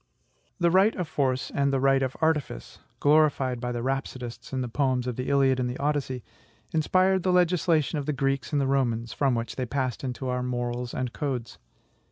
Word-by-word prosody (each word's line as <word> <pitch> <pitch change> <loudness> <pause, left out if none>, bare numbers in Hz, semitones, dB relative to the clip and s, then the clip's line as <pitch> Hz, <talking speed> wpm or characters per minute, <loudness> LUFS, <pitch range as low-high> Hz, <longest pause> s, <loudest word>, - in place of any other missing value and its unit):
The 170 -1 +3
right 195 +5 +4
of 180 -4 -3
force 130 -4 -1
and 140 0 +1
the 135 - +1
right 135 0 +3
of 130 -1 -2
artifice 150 - -1 0.2
glorified 145 -4 +3
by 125 -1 -2
the 120 -1 -3
rhapsodists 130 -2 -4
in 130 -1 -1
the 125 - -2
poems 130 0 0
of 125 -2 -3
the 125 +1 -3
"Iliad" 135 -2 +3
and 125 -1 0
the 125 - -4
"Odyssey" 140 -4 -1 0.5
inspired 185 +4 +2
the 185 - +1
legislation 175 -4 +2
of 140 - -5
the - - +2
Greeks 135 +1 -1
and 140 -3 +1
Romans, 120 -4 0
from 135 -3 +1
which 115 0 -4
they 130 -1 -2
passed 130 0 -2
into 130 0 -4
our 125 0 -1
morals 120 -1 -3
and 125 -2 -3
codes. 130 -6 -4
135 Hz, 195 wpm, -27 LUFS, 125-150 Hz, 0.5 s, right